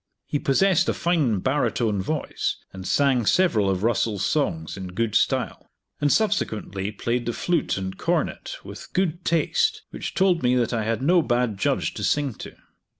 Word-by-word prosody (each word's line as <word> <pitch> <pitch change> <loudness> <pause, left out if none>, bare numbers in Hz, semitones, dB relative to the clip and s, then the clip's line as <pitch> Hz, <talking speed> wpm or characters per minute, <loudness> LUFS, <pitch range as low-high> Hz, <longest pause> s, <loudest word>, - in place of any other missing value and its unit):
He 145 - -2
possessed 185 +7 +3
a - - 0
fine 150 - +1
baritone 115 -6 0
voice, 150 +10 -2 0.2
and 95 0 -7
sang 130 -6 +2
several 115 - +3
of 95 0 -1
Russell's 105 -3 +1
songs 85 - -1
in 95 -1 -6
good 115 -1 0
style; - - 0 0.3
and, 145 -1 +2
subsequently, 105 - 0
played 120 +3 -2
the 120 - 0
flute 170 - 0
and 95 0 -4
cornet - - -2
with - - -10
good 180 -2 0
taste, 435 - +1
which - - -6
told 185 -3 +3
me 125 0 +3
that 120 -1 +1
I 110 -2 -1
had 115 +3 -1
no 175 +4 +4
bad 120 -5 0
judge - - 0
to - - -6
sing 145 -4 +1
to. - - -9
125 Hz, 170 wpm, -24 LUFS, 105-160 Hz, 0.3 s, no